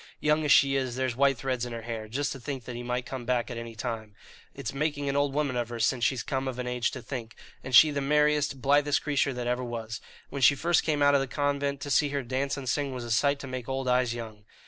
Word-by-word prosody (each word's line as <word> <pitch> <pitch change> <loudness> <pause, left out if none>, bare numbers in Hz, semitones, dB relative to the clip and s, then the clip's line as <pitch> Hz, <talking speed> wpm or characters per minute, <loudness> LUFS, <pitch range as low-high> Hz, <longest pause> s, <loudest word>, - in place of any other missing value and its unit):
Young 150 +1 +2
as 150 - +1
she 135 -1 +6
is, 130 -3 -1
there's 130 -2 -1
white 135 0 +3
threads 130 -1 -2
in 120 -1 -4
her 115 -1 -6
hair, 115 -2 -5
just 140 +6 -2
to 135 - -6
think 130 0 -5
that 125 - -6
he 120 - -5
might 125 0 -2
come 130 -1 -6
back 120 -1 -1
at 120 - -5
any 115 -1 -7
time. 110 -2 -5 0.4
It's - - -5
making 145 0 -1
an 140 - -1
old 145 0 +2
woman 145 -4 0
of 120 -1 -1
her 120 -1 -6
since 120 +1 +1
she's 130 0 +1
come 135 0 -2
of 130 -2 -4
an 125 - -3
age 125 -1 0
to 130 - -7
think; 115 -4 -6 0.3
and 130 -1 0
she 155 +4 +9
the 145 -1 -2
merriest, 150 -1 +2
blithest 145 +1 +3
creature 145 -2 +1
that 125 -1 -4
ever 125 +1 -1
was. 115 -2 -5 0.3
When 140 - -4
she 140 +2 +6
first 170 +5 +2
came 150 -2 0
out 145 0 +5
of 140 - +4
the 135 - -2
convent, 140 0 -1
to 145 - -4
see 145 +2 +3
her 140 -1 -2
dance 130 +3 -2
and 135 -2 -6
sing 140 +1 -1
was 125 - -5
a 120 - -6
sight 140 +6 +3
to 140 - -7
make 130 -1 -6
old 135 0 -2
eyes 125 -1 +2
young." 110 -3 -7
130 Hz, 275 wpm, -28 LUFS, 120-140 Hz, 0.4 s, she